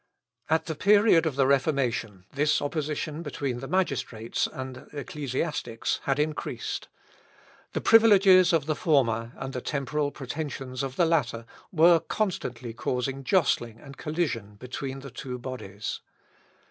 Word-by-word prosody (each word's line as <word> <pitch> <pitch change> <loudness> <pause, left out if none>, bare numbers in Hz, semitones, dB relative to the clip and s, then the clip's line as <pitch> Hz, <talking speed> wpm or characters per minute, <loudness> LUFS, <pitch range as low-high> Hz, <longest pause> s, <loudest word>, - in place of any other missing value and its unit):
At 160 +1 +2
the 160 - -3
period 200 -1 +5
of 150 - -2
the 135 -1 +3
Reformation 130 - 0
this 150 +2 +2
opposition 150 +1 -3
between 140 -5 -3
the 135 - -6
magistrates 140 -10 -1
and 130 -1 -7
ecclesiastics 145 -3 -3
had 135 0 +1
increased. 150 +1 -3 0.9
The - - -1
privileges 195 -5 +7
of 160 -4 +2
the 155 - +1
former, 115 -8 +1
and 135 0 -6
the 125 - -3
temporal 145 +2 -1
pretensions 135 -2 -5
of 135 -1 -4
the 175 - +3
latter, 120 -8 0 0.3
were 170 0 +6
constantly 125 - -3
causing 130 +3 -2
jostling 125 - +1
and 140 0 -12
collision 130 -12 -2
between 130 +4 -6
the 135 -1 -9
two 125 0 -6
bodies. 120 -5 -6
140 Hz, 135 wpm, -27 LUFS, 125-160 Hz, 0.9 s, privileges